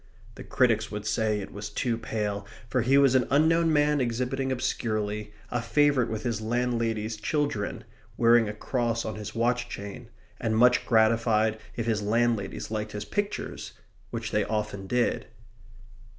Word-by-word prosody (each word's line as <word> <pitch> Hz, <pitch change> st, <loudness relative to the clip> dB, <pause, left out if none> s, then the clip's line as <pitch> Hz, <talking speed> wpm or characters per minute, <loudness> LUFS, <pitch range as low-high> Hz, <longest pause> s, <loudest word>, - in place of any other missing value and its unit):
The -, -, -10 dB
critics -, -, +2 dB
would 105 Hz, +1 st, -5 dB
say 105 Hz, -1 st, 0 dB
it -, -, -9 dB
was 105 Hz, 0 st, -6 dB
too 120 Hz, -3 st, -1 dB
pale, 105 Hz, -3 st, -3 dB, 0.2 s
for 125 Hz, +2 st, +1 dB
he 130 Hz, +4 st, +4 dB
was 140 Hz, -2 st, +5 dB
an 130 Hz, -2 st, +3 dB
unknown 160 Hz, +3 st, +4 dB
man 150 Hz, -1 st, +3 dB
exhibiting 125 Hz, +2 st, -1 dB
obscurely, 105 Hz, -4 st, -2 dB, 0.2 s
a 120 Hz, -, 0 dB
favourite 140 Hz, -1 st, +2 dB
with 110 Hz, -1 st, -4 dB
his 115 Hz, -4 st, -2 dB
landladies' 115 Hz, -2 st, -1 dB
children, 130 Hz, -3 st, -2 dB, 0.3 s
wearing 115 Hz, -2 st, +5 dB
a -, -, -4 dB
cross 115 Hz, +1 st, -1 dB
on 110 Hz, -, -3 dB
his 105 Hz, -1 st, -7 dB
watch 120 Hz, +1 st, 0 dB
chain, 100 Hz, +4 st, -7 dB, 0.3 s
and 110 Hz, -1 st, 0 dB
much 125 Hz, +1 st, +4 dB
gratified 110 Hz, -1 st, +3 dB, 0.2 s
if 115 Hz, -, -2 dB
his 110 Hz, -2 st, 0 dB
landladies 115 Hz, -1 st, 0 dB
liked 105 Hz, -1 st, -3 dB
his 105 Hz, 0 st, -4 dB
pictures 205 Hz, -, -3 dB, 0.4 s
which 115 Hz, -1 st, -4 dB
they 105 Hz, -, +2 dB
often 105 Hz, -2 st, -3 dB
did. 125 Hz, +3 st, 0 dB
115 Hz, 155 wpm, -27 LUFS, 105-125 Hz, 0.4 s, was